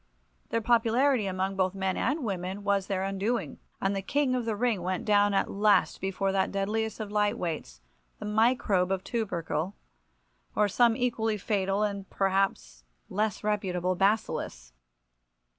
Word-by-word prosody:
Their 230 - 0
popularity 235 +1 +3
among 190 +1 -1
both 185 0 0
men 190 -1 -1
and 275 +4 0
women 190 -1 -3
was 200 -1 +1
their 190 -2 -1
undoing, 195 - -2 0.2
and 195 +1 0
the 195 - -1
king 270 +6 +1
of 250 -2 -1
the 225 -2 -1
ring 225 -3 0
went 185 +1 -2
down 205 -1 +4
at - - +1
last 205 -1 +2
before 195 0 -1
that 190 -1 +1
deadliest 215 +3 -1
of 210 -2 -5
light 210 0 +1
weights, 150 - -4 0.4
the - - -7
microbe 210 -4 +2
of 190 -1 -1
tubercle, 185 -5 -2 0.8
or 210 - +3
some 230 +3 +3
equally 225 -4 0
fatal 195 0 0
and 200 -2 -3
perhaps 190 - 0 0.3
less 215 0 -1
reputable 185 -4 0
bacillus. 185 - -1
200 Hz, 150 wpm, -28 LUFS, 190-220 Hz, 0.8 s, down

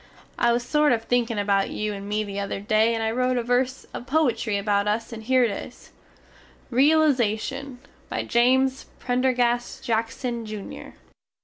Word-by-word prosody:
I 235 - +4
was 240 +1 0
sort 300 +1 +3
of 225 -1 -1
thinkin 235 -1 0
about 200 -1 +1
you 210 0 -3
and 200 0 -7
me 210 +1 0
the 200 -1 -5
other 200 0 -3
day 215 +3 +2
and 225 - -2
I 220 - 0
rote 250 +1 0
a 240 - 0
verse 250 +2 0
of 245 - -7
poitry 255 -7 +1
about 200 0 0
us 225 +3 -1
and 225 - -7
here 255 +3 +3
it 230 - +1
is, - - -9 0.8
REALIZATION 270 -2 +2 0.3
By - - -2
James 260 +2 +2
Prendergast 245 -1 0
Jackson, 230 +1 -2
Jr. 215 -2 -8
235 Hz, 165 wpm, -24 LUFS, 215-255 Hz, 0.8 s, I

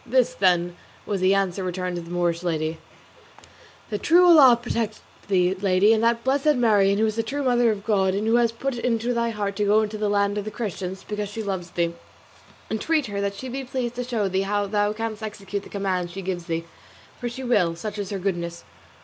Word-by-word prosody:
This, 255 0 +2
then, 175 -2 +2 0.3
was 200 -3 -2
the 190 +1 +4
answer 195 -1 0
returned 180 0 -3
to - - -4
the 170 - -11
Moorish 175 -1 0
lady: 160 -2 -2 1.1
"The 210 - -2
true 350 - +5
Allah 285 -9 +8
protect 230 -3 -3 0.3
thee, 185 -2 +2
Lady, 195 +2 +3
and 220 0 +1
that 230 0 +2
blessed 280 +3 +2
Marien 205 -5 +3
who 220 - +3
is 215 0 -2
the - - +2
true 275 +6 -3
mother 245 -2 +3
of 205 -2 -3
God, 195 -3 +2
and 205 +2 -1
who 225 +2 +3
has 235 -1 +3
put 245 +2 -3
it - - -8
into 235 0 0
thy 235 0 0
heart 205 -3 -3
to 210 - +1
go 215 +2 +4
to 215 0 -6
the 210 -1 0
land 205 0 +1
of 205 - -5
the - - -3
Christians, 190 -4 -5
because 210 -1 -3
she 220 +2 -5
loves 190 -4 -4
thee. 170 0 -1 0.8
Entreat 300 +7 0
her 200 -2 -3
that 200 0 -2
she 260 - -7
be 265 +2 -4
pleased 250 -2 -3
to 250 +1 -4
show 235 -5 -1
thee 190 0 0
how 205 +1 0
thou 205 +1 +1
canst 220 0 -4
execute 205 -2 -5
the - - -13
command 190 -3 -2
she 190 +3 -7
gives 180 -2 -3
thee, 165 -1 -2 0.5
for 245 - -3
she 255 +3 -7
will, 205 -9 +2
such 210 +5 -6
is 200 - -4
her 200 - -3
goodness. 175 -3 -3
205 Hz, 225 wpm, -24 LUFS, 190-230 Hz, 1.1 s, Allah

